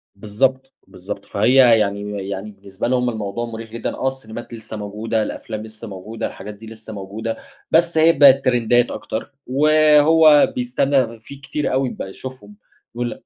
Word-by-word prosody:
بالضبط، 130 Hz, +7 st, -1 dB
بالضبط، -, -, -8 dB
فهي 125 Hz, -3 st, +4 dB
يعني 100 Hz, -1 st, -2 dB
يعني 100 Hz, +2 st, -5 dB
بالنسبة 100 Hz, +1 st, -6 dB
لهم 125 Hz, 0 st, +1 dB
الموضوع 110 Hz, 0 st, -4 dB
مُريح 115 Hz, -1 st, -8 dB
جدًا، 115 Hz, -, -4 dB
آه 130 Hz, -, -2 dB
السينيمات 120 Hz, -3 st, -6 dB
لسه 110 Hz, -1 st, -8 dB
موجودة، 105 Hz, +2 st, -2 dB
الأفلام 110 Hz, 0 st, -6 dB
لسه 110 Hz, +1 st, -9 dB
موجودة، 105 Hz, +3 st, -6 dB
الحاجات 105 Hz, +2 st, -9 dB
دي 110 Hz, +2 st, -13 dB
لسه 110 Hz, 0 st, -10 dB
موجودة، 105 Hz, +3 st, -5 dB, 0.3 s
بس 170 Hz, 0 st, +3 dB
هي 160 Hz, +1 st, +6 dB
بقِت 135 Hz, -2 st, +6 dB
ترندات 120 Hz, -1 st, +2 dB
أكتر، 110 Hz, -, -5 dB, 0.2 s
وهو 155 Hz, +2 st, +5 dB
بيستنّى 125 Hz, -1 st, 0 dB
فيه 140 Hz, +5 st, -12 dB
كتير 145 Hz, +2 st, -3 dB
أوي 130 Hz, 0 st, +1 dB
بقى 95 Hz, -, -7 dB
يشوفهم، 105 Hz, -2 st, -10 dB, 0.4 s
بيقول 120 Hz, -1 st, -4 dB
115 Hz, 155 wpm, -20 LUFS, 105-135 Hz, 0.4 s, هي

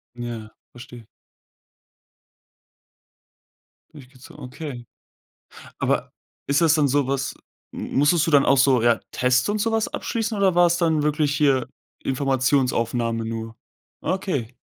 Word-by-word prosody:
Ja. 115 Hz, -3 st, -7 dB, 0.2 s
Verstehe. 120 Hz, -2 st, -12 dB, 2.9 s
Durchgezogen, 130 Hz, -3 st, -14 dB
okay. 125 Hz, -2 st, -8 dB, 0.9 s
Aber -, -, -1 dB, 0.3 s
ist 140 Hz, +3 st, +2 dB
das 160 Hz, -2 st, +4 dB
denn 150 Hz, -3 st, +2 dB
sowas 135 Hz, 0 st, 0 dB, 0.4 s
m -, -, -7 dB
musstest 150 Hz, +3 st, +3 dB
du -, -, 0 dB
dann 140 Hz, -2 st, +5 dB
auch 140 Hz, -, +4 dB
so, 130 Hz, -3 st, +4 dB
ja, 120 Hz, -1 st, +3 dB
Tests 125 Hz, +3 st, +1 dB
und 210 Hz, +1 st, 0 dB
so 225 Hz, +2 st, 0 dB
was 225 Hz, -1 st, 0 dB
abschließen 225 Hz, -1 st, -3 dB
oder 195 Hz, -3 st, +2 dB
war's 175 Hz, 0 st, +4 dB
dann 160 Hz, -3 st, +1 dB
wirklich 150 Hz, -1 st, 0 dB
hier 135 Hz, -4 st, +2 dB, 0.4 s
Informationsaufnahme 125 Hz, -4 st, 0 dB
nur? 115 Hz, 0 st, -6 dB, 0.4 s
Ah, 185 Hz, -, -1 dB
okay. 145 Hz, -, -3 dB
135 Hz, 125 wpm, -23 LUFS, 120-160 Hz, 2.9 s, dann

